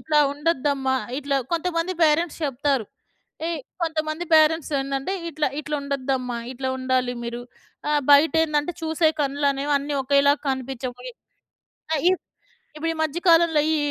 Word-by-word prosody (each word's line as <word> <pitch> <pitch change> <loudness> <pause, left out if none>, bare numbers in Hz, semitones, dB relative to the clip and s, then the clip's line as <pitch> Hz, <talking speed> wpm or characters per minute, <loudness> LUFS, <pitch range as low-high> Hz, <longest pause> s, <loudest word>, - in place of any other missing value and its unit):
ఇట్లా 305 -1 +1
ఉండొద్దమ్మా 285 -3 0 0.2
ఇట్లా 280 -1 -1 0.2
కొంతమంది 335 +1 0
పేరెంట్స్ 315 +2 +2
చెప్తారు. 275 -2 0 0.6
ఎ - - -1 0.3
కొంతమంది 315 0 -2
పేరెంట్స్ 315 0 +4
ఏందంటే, 275 +6 -3 0.2
ఇట్లా, 305 -2 0
ఇట్లా 300 0 -3
ఉండద్దమ్మా, 260 -3 -2
ఇట్లా 260 +1 -4
ఉండాలి 255 -1 0
మీరు 235 0 -4 0.5
ఆ! - - +2 0.2
బయట 290 +3 +6
ఏందంటే, 300 +1 -1
చూసే 320 0 +2
కన్నులనేవి 280 0 0
అన్నీ 285 +1 -4
ఒకేలాగా 280 +1 +3
కనిపించవు 260 -1 -4
వై - - -7 0.8
ఆహ్, 295 - -1
ఇప్ 375 - -1 0.5
ఇప్పుడు 330 +2 -2
ఈ - - -9
మధ్య 315 +2 -1
కాలంలో 330 -2 +5
ఈ - - +2
290 Hz, 140 wpm, -23 LUFS, 270-315 Hz, 0.8 s, బయట